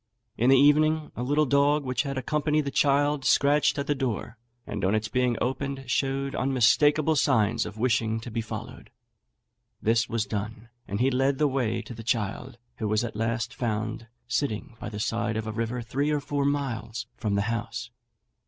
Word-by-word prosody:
In 120 +3 +2
the 135 - +7
evening 155 +2 +4
a - - -4
little 145 +4 +2
dog, 145 +2 +3
which 130 -1 0
had 140 -2 -4
accompanied 150 +3 0
the 140 - -2
child, 145 0 +2
scratched 145 +3 +3
at 140 - -1
the 145 - +1
door, 125 -4 -3 0.3
and 105 -1 -5
on 95 +3 +2
its 110 0 -1
being 125 0 +1
opened 135 +1 -2
showed 135 +1 0
unmistakeable 145 +4 +3
signs 115 -5 +2
of 105 - -9
wishing 115 -1 +1
to 120 - -8
be 115 - -1
followed. 110 - -8 0.9
This 115 +1 +1
was 115 -2 0
done; 110 +2 -5 0.2
and 100 +1 -3
he 130 +2 +3
led 135 +2 +2
the 150 - +3
way 130 -5 -1
to - - -9
the 115 - -8
child, 115 +2 -2 0.2
who 110 - -2
was 105 +2 +1
at 120 - -5
last 115 +2 -1
found 110 -2 -3 0.2
sitting 115 -4 -2
by - - -5
the 105 -1 -6
side 115 0 -1
of 110 - -3
a 110 - -3
river 115 +2 -3
three 140 +6 -1
or 150 -1 +1
four 140 0 -2
miles 120 -5 -2
from 105 -2 -1
the 100 - +1
house. 115 +1 -5
125 Hz, 190 wpm, -27 LUFS, 110-140 Hz, 0.9 s, the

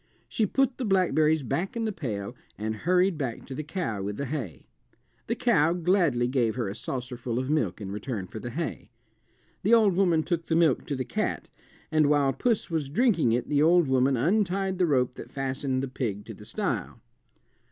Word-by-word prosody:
She 220 - 0
put 270 +4 +1
the - - -1
blackberries 160 - +2
back 170 - -2
in 225 - -1
the 220 - 0
pail 120 - -5 0.2
and 110 +1 -3
hurried 180 - +2
back 125 -5 -4
to 135 - -7
the 130 - -3
cow 150 - -3
with 100 +1 -4
the 140 - -2
hay. 130 - -5 0.6
The - - 0
cow 155 +3 +3
gladly 170 -8 +2
gave 125 -4 +1
her 120 -4 -2
a 95 - -4
saucerful 120 +1 -4
of 130 +3 -1
milk 120 - 0
in 100 -2 -6
return 105 -1 -4
for 110 +4 -8
the 120 - -6
hay. 160 +6 -4 0.7
The 220 +5 +5
old 215 -4 +4
woman 175 -4 +3
took 170 -1 -2
the 165 - +1
milk 165 -6 +3
to 145 - -2
the 130 -1 -3
cat, - - -2 0.4
and 155 -2 +4
while 145 -2 +3
puss 220 - 0
was 155 -4 -1
drinking 170 - +2
it 120 +1 -1
the 145 -1 +2
old 170 0 +5
woman 130 0 +3
untied 190 - +1
the 180 - +3
rope 125 -4 +2
that - - -8
fastened 135 -1 -1
the - - -2
pig 110 -6 -4
to - - -8
the - - -13
stile. - - -3
145 Hz, 200 wpm, -27 LUFS, 125-175 Hz, 0.7 s, The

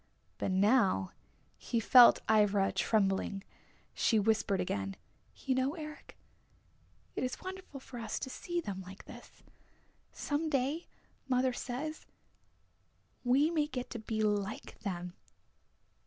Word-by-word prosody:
But - - -1
now 190 - +3 0.5
he 235 - -1
felt 240 +2 +8
Ivra 205 -2 +3
trembling. 195 -2 +1 0.5
She 225 - +2
whispered 210 -2 +2
again, 95 - -2 0.4
"You 265 - -1
know, 260 +4 0
Eric, 305 -2 -9 1.0
it - - -2
is 255 - -3
wonderful 370 -6 -7
for 255 -2 -9
us 225 -2 -3
to - - -4
see 345 +4 -3
them 195 - -5
like 190 +1 -11
this. - - -13 0.7
Some 305 +2 -2
day, 280 +4 0 0.4
mother 255 0 +2
says, 280 +6 -5 1.2
we 270 +6 +3
may 305 -3 +1
get 255 -4 -5
to 235 - -4
be 215 0 -2
like 205 -1 -2
them!" 180 -3 -4
240 Hz, 125 wpm, -32 LUFS, 200-275 Hz, 1.2 s, felt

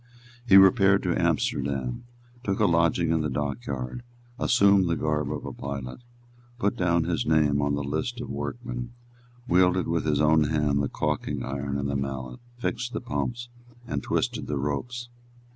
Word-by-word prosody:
He 95 -3 +8
repaired 95 0 +6
to - - 0
Amsterdam, 65 - -1 0.4
took 100 -1 -1
a - - +4
lodging 85 0 +2
in 80 -1 +2
the 75 - -1
dockyard, 65 - -3 0.4
assumed 100 -7 +4
the 85 - +2
garb 75 -1 -1
of - - -5
a - - -5
pilot, 70 - -6 0.6
put 100 -4 0
down 85 -2 +2
his 85 0 -1
name 75 -2 +3
on 70 0 +1
the 70 - -2
list 80 - -3
of 120 - -5
workmen, 120 - -5 0.5
wielded 90 -2 +3
with 85 -1 0
his 75 -2 +1
own 75 0 +4
hand 75 -2 +1
the 70 - -1
caulking - - -2
iron 70 +1 -3
and 70 0 -2
the 70 - -2
mallet, 65 -2 -4 0.2
fixed 120 0 -3
the - - -2
pumps, 120 0 -3 0.4
and - - -3
twisted - - -1
the 75 - -2
ropes. 120 - -3
80 Hz, 165 wpm, -26 LUFS, 70-100 Hz, 0.6 s, He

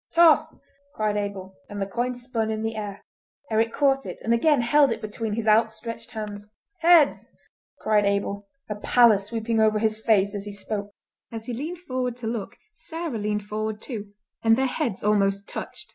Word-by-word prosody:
"Toss!" 335 -2 +5 0.4
cried 215 -1 0
Abel, 195 -2 -4
and 205 - -6
the 195 - 0
coin 240 +5 -2
spun 245 -3 -2
in 220 0 -2
the 225 0 -2
air. 205 -2 -6 0.5
Eric 225 +1 +2
caught 270 0 +2
it, - - -7
and 230 - +2
again 280 +3 +3
held 275 +3 +4
it - - -2
between 215 0 -4
his 220 0 -2
outstretched 225 +1 +1
hands. 210 -3 -7 0.3
"Heads!" 335 -3 +4 0.5
cried 210 -1 +3
Abel, 200 0 -1 0.2
a 210 - -2
pallor 225 -1 +5
sweeping 225 +2 -2
over 215 -1 +4
his 215 0 0
face 200 -3 +3
as 200 -1 -5
he 205 - -6
spoke. 205 0 -4 0.4
As 225 -1 -6
he 245 - -4
leaned 320 +8 -5
forward 255 -6 -3
to 240 - -8
look 225 -3 -4 0.2
Sarah 325 - -5
leaned 210 0 -2
forward 215 0 -3
too, 210 -4 -7 0.3
and 225 0 +5
their 265 +2 +1
heads 250 -5 -2
almost 200 -1 +2
touched. - - -7
220 Hz, 180 wpm, -25 LUFS, 205-245 Hz, 0.5 s, Toss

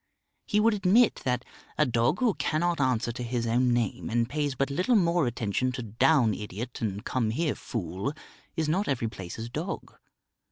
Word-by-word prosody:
He 210 - +2
would 225 +1 +4
admit 210 +4 +4
that 125 -1 0 0.3
a 150 - +4
dog 120 - +1
who 240 -5 +3
cannot 170 -1 0
answer 125 -3 +1
to 120 - -7
his 120 -1 -2
own 120 +2 +2
name 120 -4 -1
and 115 0 +1
pays 145 0 -1
but 135 +2 0
little 180 - +2
more 170 - +3
attention 120 +2 -1
to 125 - -4
"Down, 115 +2 +3
idiot," 105 +5 -6
and 105 -2 -3
"Come 120 -4 0
here, 150 +6 0
fool," 95 - -4 0.4
is 160 -1 0
not 185 +7 +1
every 120 -5 0
place's 100 +2 -7
dog. 155 +10 -5
125 Hz, 175 wpm, -28 LUFS, 115-160 Hz, 0.4 s, would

